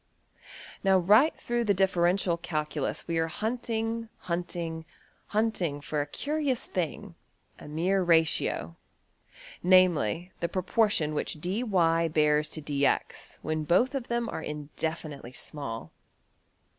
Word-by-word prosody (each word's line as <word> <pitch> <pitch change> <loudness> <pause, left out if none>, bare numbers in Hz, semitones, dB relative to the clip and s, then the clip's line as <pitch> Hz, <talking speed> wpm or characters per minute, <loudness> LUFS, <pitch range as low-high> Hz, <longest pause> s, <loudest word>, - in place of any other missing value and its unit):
Now 190 -1 +5
right 210 - +5
through 240 0 -1
the 200 -2 +3
differential 180 -1 +2
calculus 150 -4 -3
we 165 -1 0
are 160 - +1
hunting, 225 +3 -2
hunting, 170 -2 -3 0.4
hunting 205 -9 0
for 145 +1 -2
a 145 - -3
curious 285 - -1
thing, 185 +2 -3 0.5
\DPPageSep{025.png}% - - -11
a - - -9
mere 175 +6 +1
ratio, 160 - +2 0.9
namely, 180 - +3
the 170 - -1
proportion 185 -3 +1
which 150 +1 -2
$dy$~bears 165 -6 +2
to~$dx$ 145 -3 -1
when 155 0 -1
both 185 - +3
of 265 -3 -3
them 235 0 -1
are - - -4
indefinitely 150 -3 -5
small. 115 - -4
170 Hz, 115 wpm, -28 LUFS, 155-210 Hz, 0.9 s, Now